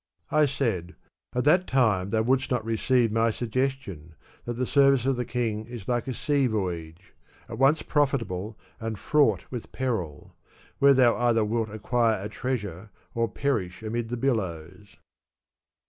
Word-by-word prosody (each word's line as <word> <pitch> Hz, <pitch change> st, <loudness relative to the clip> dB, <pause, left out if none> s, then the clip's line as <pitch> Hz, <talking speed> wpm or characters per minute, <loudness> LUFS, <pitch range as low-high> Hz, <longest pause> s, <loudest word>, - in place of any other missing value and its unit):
'' -, -, -37 dB
I 150 Hz, -, +5 dB
said: 115 Hz, -10 st, -2 dB, 0.2 s
" -, -, -32 dB
At 125 Hz, -, +1 dB
that 175 Hz, +5 st, +4 dB
time 110 Hz, -8 st, +2 dB
thou 110 Hz, +1 st, +1 dB
wouldst 130 Hz, +3 st, +1 dB
not 125 Hz, -3 st, -1 dB
receive 115 Hz, +1 st, +2 dB
my 115 Hz, +1 st, +2 dB
suggestion, 115 Hz, -, -3 dB, 0.3 s
that 120 Hz, -, -3 dB
the 125 Hz, +2 st, -2 dB
service 135 Hz, -2 st, +4 dB
of 135 Hz, 0 st, +2 dB
the 125 Hz, 0 st, -2 dB
king 110 Hz, -3 st, -2 dB
is 120 Hz, -5 st, -9 dB
like 120 Hz, -1 st, -1 dB
a 130 Hz, -, -2 dB
sea 140 Hz, -3 st, +1 dB
voyage, 90 Hz, -5 st, -4 dB, 0.3 s
at 115 Hz, -, -7 dB
once 140 Hz, +4 st, +4 dB
profitable 115 Hz, -9 st, -1 dB, 0.2 s
and 110 Hz, -1 st, -4 dB
fraught 110 Hz, -, +2 dB
with 125 Hz, -3 st, -6 dB
peril; 110 Hz, -, -3 dB, 0.5 s
where 140 Hz, 0 st, +6 dB
thou 125 Hz, -3 st, +5 dB
either 115 Hz, -3 st, +2 dB
wilt 110 Hz, +1 st, -1 dB
acquire 110 Hz, +1 st, 0 dB
a 105 Hz, -, -4 dB
treasure, 105 Hz, -6 st, -4 dB, 0.2 s
or 115 Hz, -1 st, 0 dB
perish 110 Hz, -7 st, -2 dB
amid 115 Hz, +1 st, -3 dB
the 120 Hz, -, -3 dB
billows. 95 Hz, -6 st, -3 dB
115 Hz, 160 wpm, -26 LUFS, 105-130 Hz, 0.5 s, where